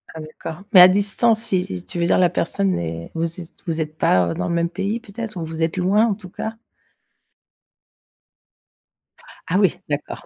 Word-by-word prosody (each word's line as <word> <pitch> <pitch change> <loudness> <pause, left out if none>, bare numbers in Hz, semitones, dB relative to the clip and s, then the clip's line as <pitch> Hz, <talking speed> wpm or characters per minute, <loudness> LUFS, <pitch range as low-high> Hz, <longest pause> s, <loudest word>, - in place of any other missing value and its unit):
Ah 160 - -6
d'accord, 155 +3 -8
mais 185 - +10
à 180 - +11
distance, 205 +4 +2
i 185 -2 +1
i 90 -1 -5
tu 135 - -6
veux 170 - +2
dire - - +3
la 180 -1 +4
personne 190 +3 0
est 85 0 -5
vous 165 +2 -3
êtes 165 - -12 0.2
vous 165 -1 -1
êtes 155 0 -5
pas, 90 - +3
heu, - - -2
dans - - -3
le 170 - -1
même 170 0 +1
pays 195 +5 -2
peut-être? 225 -2 -7
Ou 165 - -3
vous 160 0 -6
êtes 160 +2 0
loin 195 +5 +3
en 210 - 0
tout 190 -3 -12
cas? 220 +5 -5 2.9
Ah 180 - +1
oui, 195 -4 +3
d'accord. 145 0 -4
180 Hz, 200 wpm, -21 LUFS, 160-200 Hz, 2.9 s, à